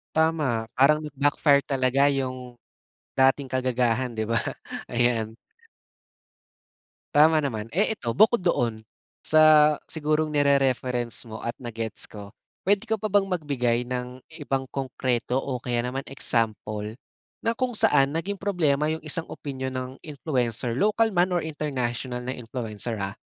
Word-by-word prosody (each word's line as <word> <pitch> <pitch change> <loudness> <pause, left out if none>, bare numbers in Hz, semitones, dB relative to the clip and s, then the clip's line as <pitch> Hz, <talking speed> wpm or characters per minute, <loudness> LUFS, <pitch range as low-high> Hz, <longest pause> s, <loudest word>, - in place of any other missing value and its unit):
Tama, 150 -9 +1
parang 150 +3 +5
nag-backfire 145 0 +2
talaga 135 0 +2
yung 130 -2 -4 0.7
dating 135 0 +3
kagagahan, 125 -1 0
'di 110 - -1
ba, 115 - +3 0.5
ayan. 115 -2 0 1.8
Tama 155 +2 +6
naman. 110 -4 -4
Eh, 205 - +1
eto 120 - -5
bukod 220 -1 +5
doon, 120 -10 0 0.4
sa 155 -1 +6
sigurong 155 0 -1
ni-re-reference 130 -4 +1
mo 110 - -6
at 115 - -1
na-gets 115 -3 -5
ko. 105 +1 -10 0.3
Pwede 205 +3 +2
ka 220 - +2
pa 215 - -6
bang 200 -1 +2
magbigay 125 -8 0
ng 125 0 -4 0.2
ibang 135 -2 -1
konkreto 130 -2 -1
o 130 -2 -3
kaya 120 -1 -1
naman 130 +2 -3
example, 110 -4 -2 0.5
na 230 - +2
kung 245 -2 -2
saan 150 -9 +3
naging 195 +3 -4
problema 155 -7 +1
yung 160 0 -3
isang 165 +1 -3
opinyon 130 -3 -5
ng 130 0 -4
influencer, 125 -6 -2
local 215 - +2
man 175 +1 +3
or 175 -3 0
international 125 -5 -3
na 130 - -2
influencer, 115 -2 -5
ah? 95 -1 -3
130 Hz, 135 wpm, -25 LUFS, 120-155 Hz, 1.8 s, Tama